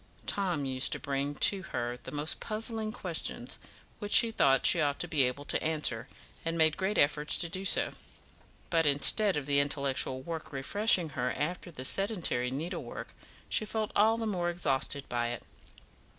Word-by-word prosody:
Tom 180 -8 -1
used 130 0 0
to - - -3
bring 140 +1 -3
to 195 +4 +3
her 120 -9 -4
the 125 - -11
most 150 +1 -3
puzzling 220 0 -3
questions, 245 - -3 0.4
which 205 -1 -4
she 230 - +7
thought 135 - +3
she 170 - +6
ought 145 -1 0
to 175 - -3
be 160 -4 +1
able 130 +3 -1
to - - -1
answer, 150 -7 -1 0.4
and 165 0 -2
made 155 -1 +3
great 195 +2 -2
efforts 150 +1 +2
to 170 - -1
do 185 +3 -5
so; 195 - +1 0.8
but 165 -2 +2
instead 165 +7 +6
of 145 - -3
the 140 0 +2
intellectual 140 -2 +1
work 165 0 -6
refreshing 175 +5 0
her 125 -3 -2
after 170 +5 -4
the 130 -6 -5
sedentary 175 - +1
needlework, 155 +8 -6 0.4
she - - 0
felt 215 0 -3
all 220 +2 +4
the 230 - -3
more 180 -5 -1
exhausted 140 -4 -1
by 120 -1 -1
it. 120 0 -5
155 Hz, 175 wpm, -30 LUFS, 140-195 Hz, 0.8 s, she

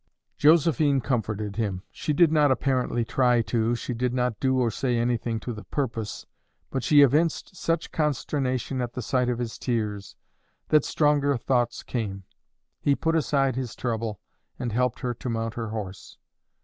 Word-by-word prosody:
Josephine 155 -2 +4
comforted 110 -5 -2
him. 100 -5 -2
She - - -3
did 165 +1 +4
not 150 -2 +4
apparently 130 -3 +1
try 125 -1 +3
to, 115 0 0
she 125 - -4
did 125 +1 -1
not 125 -3 0
do 130 -1 +2
or 120 -3 +2
say 125 -1 0
anything 115 -1 0
to 120 - -4
the 105 - -8
purpose; 115 -6 -3 0.5
but 135 - -1
she 145 +3 +6
evinced 155 +6 +1
such 165 -2 -1
consternation 135 -3 -1
at 120 -1 -3
the 125 - -4
sight 125 +2 +1
of 120 - 0
his 120 -2 -4
tears, 105 -5 -2 0.5
that 155 -2 +5
stronger 145 -2 +2
thoughts 120 -1 0
came. 100 -5 -4 0.6
He 140 - +2
put 165 +2 0
aside 135 -4 +1
his 130 -3 -4
trouble, 115 -4 -3 0.4
and 120 -2 -3
helped 125 +1 0
her 125 -2 -1
to 120 +2 -6
mount 115 -1 -2
her 115 -2 -4
horse. 105 -3 -7
125 Hz, 165 wpm, -26 LUFS, 115-140 Hz, 0.6 s, she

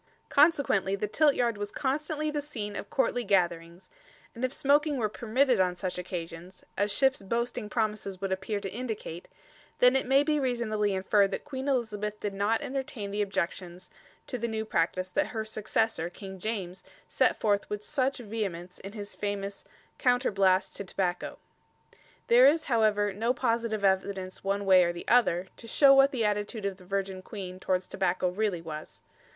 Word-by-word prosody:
Consequently 280 - +3
the 210 +1 -2
Tiltyard 245 -4 +2
was 205 0 -3
constantly 300 +4 -2
the 295 -1 -2
scene 220 -9 -6
of 200 - -6
courtly 245 -2 +1
gatherings; 175 -2 0 0.5
and 235 - -8
if 255 - +1
smoking 290 +1 +2
were 225 -4 +1
permitted 240 +3 +1
on 180 -1 +2
such 180 0 -4
occasions 175 0 -7
as 205 +1 0
Shift's 265 +2 +2
boasting 235 +2 -2
promises 210 -4 -2
would 195 0 -3
appear 190 +2 -2
to 195 -2 -5
indicate 220 -8 -5 0.5
then 250 +1 +5
it 265 - +1
may 270 +2 +5
be 300 0 +1
reasonably 215 -6 0
inferred 195 +1 +3
that - - -5
Queen 270 -2 -5
Elizabeth 215 -5 -1
did 205 -1 -3
not 205 +3 +1
entertain 255 -6 -4
the 205 +1 -1
objections 185 -2 -3 0.3
to 250 - -4
the 235 - -1
new 220 -1 -3
practice 185 -2 0
that 185 - 0
her 220 -2 -4
successor, 220 -4 -1
King 190 +1 -9
James, 190 -3 -4 0.2
set - - +2
forth 205 -2 +1
with 210 0 -4
such 270 -2 0
vehemence 195 -6 -5
in 195 +1 -9
his 205 -2 -6
famous 200 -1 -4 0.3
"Counterblaste 200 -7 +2
to - - -4
Tobacco." 180 -1 -2 0.9
There 245 +3 +7
is, 310 +3 +3
however, 215 -5 +2
no 230 +5 0
positive 230 -4 0
evidence 190 -1 -1
one 200 +1 -1
way 185 -2 +7
or 175 0 0
the 175 - -9
other, 190 -7 +3
to 230 - -10
show 275 +4 +6
what 270 0 +6
the 245 -5 -1
attitude 210 +1 -1
of 195 -2 -2
the 185 - -16
Virgin 195 0 -3
Queen 185 -3 -7
towards 185 0 0
tobacco 185 -1 0
really 185 -2 -1
was. 155 -1 -8
210 Hz, 170 wpm, -29 LUFS, 190-245 Hz, 0.9 s, There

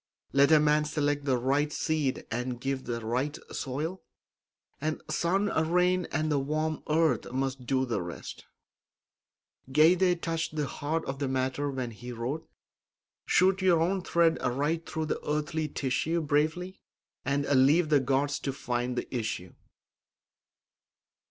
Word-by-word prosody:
Let 140 +2 +5
a 155 - +8
man 150 0 +3
select 145 -1 -1
the 130 -3 +2
right 140 +4 +1
seed 150 -5 -1
and 125 +1 -2
give 135 +1 -1
it - - -16
the 115 -2 -4
right 130 +6 -1
soil, 155 +8 -3 0.8
and 155 +1 -1
sun, 175 +6 +1 0.3
rain, 180 +1 +3
and 155 0 0
the 145 - +2
warm 155 +2 -1
earth 155 -7 +2
must 130 -1 -2
do 130 0 +2
the 115 -6 -1
rest. 85 -1 -8 1.3
Goethe 175 +4 +5
touched 165 -2 -2
the 150 -1 0
heart 155 +4 -3
of 135 0 -4
the 140 - -1
matter 130 +2 -1
when 130 -3 -3
he 120 +3 -8
wrote: 125 +7 -4 0.8
"Shoot 190 +1 +4
your 180 -3 +4
own 185 +4 +1
thread 170 -2 +3
right 145 +6 0
through 160 0 -2
the 155 - -3
earthly 150 +1 -1
tissue 150 +4 -1
Bravely; 160 +5 0 0.4
and 140 +1 0
leave 145 +5 +4
the 150 -2 +5
gods 140 +2 0
to 135 - -2
find 125 -1 -2
the - - -1
issue." 100 -6 -3
145 Hz, 145 wpm, -29 LUFS, 130-160 Hz, 1.3 s, a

